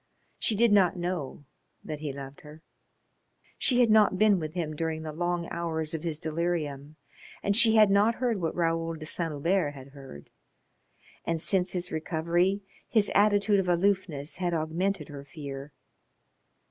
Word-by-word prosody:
She 220 Hz, -, +2 dB
did 230 Hz, +1 st, +3 dB
not 195 Hz, -3 st, +4 dB
know 175 Hz, -5 st, -4 dB, 0.4 s
that 155 Hz, -1 st, -6 dB
he 150 Hz, -2 st, -4 dB
loved 135 Hz, 0 st, -9 dB
her. 155 Hz, +2 st, -14 dB, 1.0 s
She 250 Hz, -2 st, +3 dB
had 235 Hz, -3 st, +4 dB
not 215 Hz, -3 st, +5 dB
been 210 Hz, -2 st, +4 dB
with 155 Hz, 0 st, -6 dB
him 155 Hz, -4 st, -3 dB
during 160 Hz, 0 st, -3 dB
the 155 Hz, -1 st, -6 dB
long 175 Hz, +1 st, -2 dB
hours 160 Hz, -2 st, -2 dB
of 160 Hz, -, -3 dB
his 160 Hz, -2 st, -3 dB
delirium 155 Hz, -3 st, -3 dB, 0.5 s
and 200 Hz, 0 st, +1 dB
she 225 Hz, 0 st, +5 dB
had 215 Hz, -2 st, +6 dB
not 210 Hz, +3 st, +3 dB
heard 235 Hz, -6 st, -1 dB
what 165 Hz, -, -2 dB
Raoul 165 Hz, -1 st, 0 dB
de 155 Hz, -1 st, -9 dB
Saint 165 Hz, +1 st, 0 dB
Hubert 150 Hz, +1 st, 0 dB
had 135 Hz, 0 st, -11 dB
heard. 135 Hz, -, -13 dB, 0.9 s
And 165 Hz, -1 st, -1 dB
since 185 Hz, +2 st, +2 dB
his 180 Hz, -1 st, -2 dB
recovery 170 Hz, +5 st, 0 dB, 0.3 s
his 215 Hz, -3 st, +3 dB
attitude 205 Hz, 0 st, +3 dB
of 190 Hz, -, -1 dB
aloofness 175 Hz, -5 st, 0 dB
had 175 Hz, -2 st, -1 dB
augmented 165 Hz, +2 st, -2 dB
her 140 Hz, -1 st, -8 dB
fear. 140 Hz, -2 st, -8 dB
170 Hz, 160 wpm, -28 LUFS, 155-195 Hz, 1.0 s, had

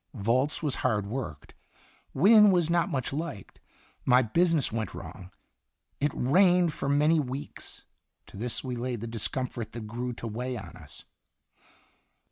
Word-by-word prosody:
Volz 125 Hz, +9 st, 0 dB
was 145 Hz, -3 st, -1 dB
hard 110 Hz, -5 st, +1 dB
worked. 100 Hz, -, -6 dB, 0.6 s
Wynne 210 Hz, +7 st, +7 dB
was 175 Hz, -3 st, +2 dB
not 170 Hz, +1 st, +2 dB
much 135 Hz, -6 st, -2 dB
liked. 145 Hz, -, -6 dB, 0.4 s
My 125 Hz, 0 st, +5 dB
business 165 Hz, +4 st, +2 dB
went 110 Hz, -4 st, -3 dB
wrong. 90 Hz, -1 st, -9 dB, 0.7 s
It 145 Hz, +1 st, +1 dB
rained 175 Hz, +4 st, +4 dB
for 140 Hz, -, -3 dB
many 150 Hz, +3 st, +4 dB
weeks; 135 Hz, 0 st, -6 dB, 0.4 s
to -, -, -15 dB
this 115 Hz, +3 st, -4 dB
we 130 Hz, -2 st, -4 dB
laid 120 Hz, -2 st, -3 dB
the -, -, -4 dB
discomfort 115 Hz, 0 st, -4 dB
that 115 Hz, -2 st, -6 dB
grew 120 Hz, +3 st, -4 dB
to 115 Hz, -, -8 dB
weigh 125 Hz, +3 st, -4 dB
on 95 Hz, -6 st, -9 dB
us. -, -, -14 dB
130 Hz, 145 wpm, -28 LUFS, 115-155 Hz, 0.7 s, Wynne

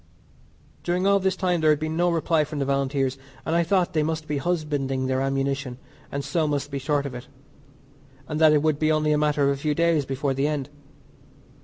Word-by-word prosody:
During 180 Hz, +2 st, -1 dB
all 200 Hz, 0 st, +4 dB
this 190 Hz, 0 st, 0 dB
time 180 Hz, -3 st, 0 dB
there 155 Hz, -, +4 dB
had 150 Hz, -1 st, +3 dB
been 155 Hz, 0 st, -3 dB
no 175 Hz, +1 st, +2 dB
reply 165 Hz, -1 st, +1 dB
from 150 Hz, 0 st, -6 dB
the 140 Hz, -, 0 dB
Volunteers, 135 Hz, -1 st, 0 dB, 0.3 s
and 160 Hz, -, 0 dB
I 170 Hz, -, +4 dB
thought 180 Hz, +1 st, +1 dB
they 155 Hz, -, +2 dB
must 155 Hz, 0 st, -2 dB
be 145 Hz, -1 st, -1 dB
husbanding 145 Hz, -5 st, -1 dB
their 130 Hz, 0 st, 0 dB
ammunition, 135 Hz, -1 st, -1 dB, 0.3 s
and 140 Hz, 0 st, -3 dB
so 165 Hz, -3 st, 0 dB
must 145 Hz, -1 st, -2 dB
be 140 Hz, -, -3 dB
short 145 Hz, +1 st, 0 dB
of 140 Hz, -, -5 dB
it, 125 Hz, +1 st, -8 dB, 1.0 s
and 155 Hz, 0 st, -3 dB
that 155 Hz, -1 st, +7 dB
it 150 Hz, -1 st, +3 dB
would 155 Hz, -2 st, +1 dB
be 155 Hz, 0 st, +2 dB
only 155 Hz, 0 st, +2 dB
a 150 Hz, -, +3 dB
matter 150 Hz, -1 st, +1 dB
of 140 Hz, -, +3 dB
a 140 Hz, -, -11 dB
few 150 Hz, -1 st, 0 dB
days 165 Hz, -4 st, +2 dB
before 135 Hz, +1 st, -1 dB
the 135 Hz, +2 st, 0 dB
end. 145 Hz, -3 st, -2 dB
150 Hz, 220 wpm, -24 LUFS, 140-160 Hz, 1.0 s, that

